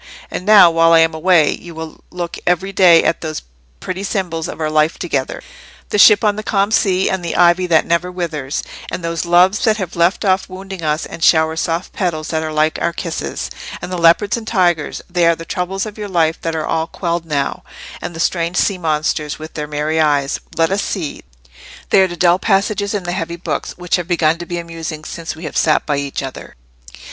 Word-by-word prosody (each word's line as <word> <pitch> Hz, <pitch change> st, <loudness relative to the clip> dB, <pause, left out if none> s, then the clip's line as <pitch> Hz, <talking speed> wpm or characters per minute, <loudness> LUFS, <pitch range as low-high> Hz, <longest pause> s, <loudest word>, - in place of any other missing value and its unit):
And 180 Hz, -, -5 dB
now, 205 Hz, -5 st, +8 dB
while 165 Hz, 0 st, +4 dB
I 165 Hz, -, +7 dB
am 165 Hz, 0 st, +2 dB
away, 160 Hz, -1 st, +3 dB
you 170 Hz, -1 st, -11 dB
will 160 Hz, -1 st, -9 dB
look 175 Hz, -1 st, -5 dB
every 180 Hz, +2 st, +1 dB
day 180 Hz, -4 st, +6 dB
at -, -, 0 dB
those 155 Hz, -1 st, -5 dB, 0.4 s
pretty 185 Hz, +1 st, -5 dB
symbols 180 Hz, -5 st, -2 dB
of -, -, -8 dB
our 155 Hz, -, 0 dB
life 155 Hz, +1 st, +2 dB
together—the -, -, -5 dB
ship 210 Hz, +2 st, +7 dB
on 210 Hz, -1 st, +2 dB
the -, -, -3 dB
calm 200 Hz, -1 st, 0 dB
sea, 190 Hz, -4 st, +2 dB
and 190 Hz, -2 st, -1 dB
the 170 Hz, -, -3 dB
ivy 175 Hz, +1 st, +4 dB
that 160 Hz, -2 st, +3 dB
never 170 Hz, +2 st, 0 dB
withers, 155 Hz, -6 st, -3 dB, 0.3 s
and 180 Hz, -, -5 dB
those 165 Hz, 0 st, -2 dB
Loves 180 Hz, +4 st, +4 dB
that 220 Hz, -3 st, +3 dB
have 185 Hz, -5 st, -5 dB
left 175 Hz, +5 st, +1 dB
off 190 Hz, 0 st, +1 dB
wounding 190 Hz, 0 st, -8 dB
us 155 Hz, 0 st, -1 dB
and 165 Hz, -, -8 dB
shower 160 Hz, -1 st, +4 dB
soft 165 Hz, +2 st, -2 dB
petals 165 Hz, -5 st, -2 dB
that 160 Hz, -1 st, -1 dB
are 160 Hz, 0 st, -4 dB
like 155 Hz, +1 st, +1 dB
our 170 Hz, -, 0 dB
kisses; 170 Hz, -1 st, -4 dB, 0.3 s
and -, -, -7 dB
the 180 Hz, -, -2 dB
leopards 170 Hz, +5 st, +4 dB
and 230 Hz, -2 st, -7 dB
tigers, 175 Hz, -8 st, 0 dB
they 175 Hz, -1 st, +2 dB
are 170 Hz, -, +4 dB
the 165 Hz, -, -9 dB
troubles 190 Hz, +2 st, -3 dB
of 215 Hz, 0 st, -9 dB
your 205 Hz, -1 st, -5 dB
life 165 Hz, -3 st, +1 dB
that 165 Hz, -1 st, -2 dB
are 155 Hz, -1 st, -2 dB
all 160 Hz, 0 st, -1 dB
quelled 170 Hz, -2 st, -3 dB
now; 140 Hz, -3 st, -2 dB, 0.4 s
and 175 Hz, -, -6 dB
the -, -, -7 dB
strange 170 Hz, +1 st, 0 dB
sea 195 Hz, -3 st, +1 dB
monsters, 155 Hz, -2 st, -1 dB
with 155 Hz, +1 st, -9 dB
their 150 Hz, -1 st, -4 dB
merry 150 Hz, +2 st, -1 dB
eyes—let 150 Hz, +3 st, 0 dB
us 200 Hz, +1 st, +1 dB
see—they 65 Hz, -, -3 dB
are 190 Hz, -, +4 dB
the 175 Hz, -1 st, -8 dB
dull 175 Hz, +1 st, +3 dB
passages 200 Hz, +1 st, 0 dB
in 200 Hz, -, -2 dB
the 175 Hz, -, -3 dB
heavy 170 Hz, -1 st, -3 dB
books, 170 Hz, -, -4 dB
which 180 Hz, 0 st, 0 dB
have 175 Hz, -2 st, -5 dB
begun 165 Hz, -2 st, +1 dB
to 175 Hz, -, -7 dB
be 175 Hz, -, -4 dB
amusing 165 Hz, -2 st, -6 dB
since 165 Hz, 0 st, -6 dB
we 160 Hz, -, -11 dB
have 155 Hz, -, -6 dB
sat 155 Hz, -, +2 dB
by 145 Hz, -2 st, 0 dB
each 140 Hz, 0 st, -3 dB
other." 135 Hz, -1 st, -8 dB
170 Hz, 215 wpm, -17 LUFS, 160-185 Hz, 0.4 s, now